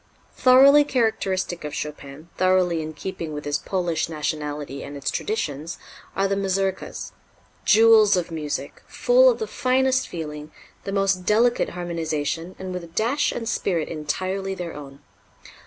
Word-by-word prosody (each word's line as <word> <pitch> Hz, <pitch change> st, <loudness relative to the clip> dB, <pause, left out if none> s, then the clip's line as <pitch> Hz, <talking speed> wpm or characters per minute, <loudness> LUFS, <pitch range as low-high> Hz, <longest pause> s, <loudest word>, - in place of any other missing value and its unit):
Thoroughly 275 Hz, +3 st, +7 dB
characteristic 195 Hz, -, -1 dB
of 150 Hz, -, -5 dB
Chopin, 150 Hz, +1 st, -7 dB
thoroughly 185 Hz, -3 st, +2 dB
in 155 Hz, 0 st, -6 dB
keeping 165 Hz, 0 st, -6 dB
with 150 Hz, 0 st, -6 dB
his 145 Hz, -1 st, 0 dB
Polish 175 Hz, -4 st, -1 dB
nationality 150 Hz, -3 st, -4 dB
and 145 Hz, -, -8 dB
its 135 Hz, -1 st, -2 dB
traditions, 160 Hz, -6 st, -3 dB, 0.4 s
are 195 Hz, 0 st, +2 dB
the 195 Hz, -, 0 dB
Mazurkas 195 Hz, -1 st, -2 dB, 0.5 s
jewels 220 Hz, -2 st, +6 dB
of 175 Hz, -1 st, -2 dB
music, 155 Hz, -2 st, -4 dB
full -, -, +4 dB
of 485 Hz, -, +1 dB
the 440 Hz, -, -3 dB
finest 260 Hz, -5 st, +1 dB
feeling, 150 Hz, -2 st, -7 dB, 0.3 s
the 195 Hz, -, -3 dB
most 195 Hz, -2 st, +1 dB
delicate 235 Hz, +3 st, +3 dB
harmonization, 165 Hz, -1 st, -3 dB
and 185 Hz, -1 st, -6 dB
with 180 Hz, -1 st, -5 dB
a -, -, -9 dB
dash 235 Hz, -, 0 dB
and 230 Hz, -, -5 dB
spirit 175 Hz, -8 st, -1 dB
entirely 185 Hz, +5 st, -3 dB
their 175 Hz, -2 st, -6 dB
own. 140 Hz, -1 st, -10 dB
180 Hz, 145 wpm, -23 LUFS, 155-210 Hz, 0.5 s, Thoroughly